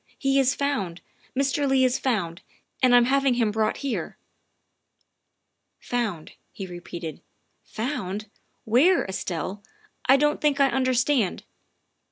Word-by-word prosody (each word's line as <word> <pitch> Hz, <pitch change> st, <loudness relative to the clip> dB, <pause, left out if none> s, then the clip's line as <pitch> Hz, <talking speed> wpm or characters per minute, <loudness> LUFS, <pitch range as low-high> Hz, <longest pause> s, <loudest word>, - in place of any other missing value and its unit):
He 275 Hz, 0 st, +2 dB
is 270 Hz, 0 st, +3 dB
found 205 Hz, -12 st, -2 dB, 0.4 s
Mr. 275 Hz, +1 st, +1 dB
Leigh 265 Hz, -1 st, +4 dB
is 255 Hz, 0 st, +2 dB
found, 190 Hz, -10 st, -1 dB, 0.4 s
and 250 Hz, -1 st, +5 dB
I'm 245 Hz, -1 st, +6 dB
having 270 Hz, 0 st, +2 dB
him 230 Hz, -3 st, +1 dB
brought 215 Hz, 0 st, 0 dB
here." 270 Hz, -, -3 dB, 1.6 s
"Found," 220 Hz, -10 st, -3 dB, 0.2 s
he 195 Hz, -, -7 dB
repeated, 175 Hz, -2 st, -7 dB, 0.4 s
"found? 215 Hz, -5 st, -4 dB, 0.4 s
Where, 280 Hz, +12 st, +4 dB
Estelle? 190 Hz, +1 st, -4 dB, 0.5 s
I 270 Hz, -, +8 dB
don 295 Hz, +1 st, +2 dB
't -, -, -28 dB
think 290 Hz, -2 st, +2 dB
I 275 Hz, -1 st, +5 dB
understand. 255 Hz, -4 st, +1 dB
245 Hz, 125 wpm, -25 LUFS, 195-275 Hz, 1.6 s, I